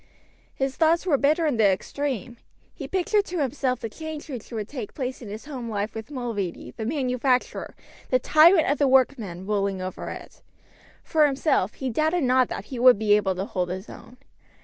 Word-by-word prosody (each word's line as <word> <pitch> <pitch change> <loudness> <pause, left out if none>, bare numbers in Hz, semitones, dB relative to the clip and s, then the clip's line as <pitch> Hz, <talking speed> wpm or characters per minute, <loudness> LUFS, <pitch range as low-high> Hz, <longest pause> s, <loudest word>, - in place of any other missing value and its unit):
His 270 -1 -2
thoughts 330 +2 +3
were 335 -6 +3
bitter 300 +5 +2
in 290 -6 +1
the 220 - +4
extreme. 245 +4 -2 0.4
He - - -7
pictured 405 +3 +1
to 360 - -5
himself 265 -3 -1
the - - -3
change 315 +5 -8
which 245 -4 -7
would 215 -3 -4
take 245 -7 -7
place 260 -2 -4
in 225 - -8
his 215 +5 -8
home 255 -6 -6
life 205 0 -3
with 220 +1 -7
Mulready 225 - -4
the 220 - -4
manufacturer, 255 -2 -1 0.3
the 255 - +4
tyrant 315 +6 +5
of 285 - +1
the 285 - +4
workmen, 240 -9 +1
ruling 200 -2 -1
over 185 0 -5
it. - - -10 0.6
For 310 -2 +3
himself 270 - 0
he 265 -2 -3
doubted 315 +6 +1
not 255 -1 +3
that 195 - -6
he 245 - -4
would 250 -2 +7
be 210 0 +3
able 200 -3 +2
to 190 +2 -3
hold 180 -3 -2
his 190 +3 -6
own. 250 - -13
255 Hz, 195 wpm, -25 LUFS, 210-290 Hz, 0.6 s, would